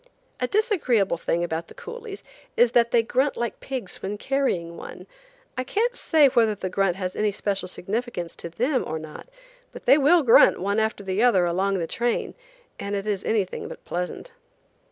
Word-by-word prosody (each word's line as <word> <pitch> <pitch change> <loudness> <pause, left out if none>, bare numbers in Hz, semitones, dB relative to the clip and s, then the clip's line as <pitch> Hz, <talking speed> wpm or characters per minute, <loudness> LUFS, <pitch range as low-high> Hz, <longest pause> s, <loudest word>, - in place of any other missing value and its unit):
A 250 - 0
disagreeable 260 - +1
thing 170 +1 0
about 165 -1 -3
the - - -15
coolies 470 -4 -8 0.3
is 240 -1 +5
that 235 -2 +4
they 235 -1 +3
grunt 260 +5 0
like 235 -1 -3
pigs 255 -8 -6
when 205 +2 -4
carrying 205 -11 -1
one. - - -10 0.5
I 255 - -2
can't 455 - 0
say 315 - +4
whether 230 -4 +3
the 185 -1 -4
grunt 195 -2 +1
has 185 -1 -4
any 210 -1 +1
special 200 -2 -2
significance 195 -2 -4
to 170 - -7
them 250 - 0
or 160 - -3
not, 155 - -10 0.4
but - - -11
they 285 - +6
will 315 +4 +5
grunt 230 - +6
one 200 +3 0
after 220 -2 -1
the 190 +2 -1
other 200 -8 +4
along 190 +3 0
the 170 - -1
train, 235 +7 -1 0.5
and 200 0 -3
it 200 0 -3
is 205 -2 -2
anything 205 -4 -1
but - - -11
pleasant. 180 - -4
215 Hz, 185 wpm, -24 LUFS, 185-260 Hz, 0.5 s, they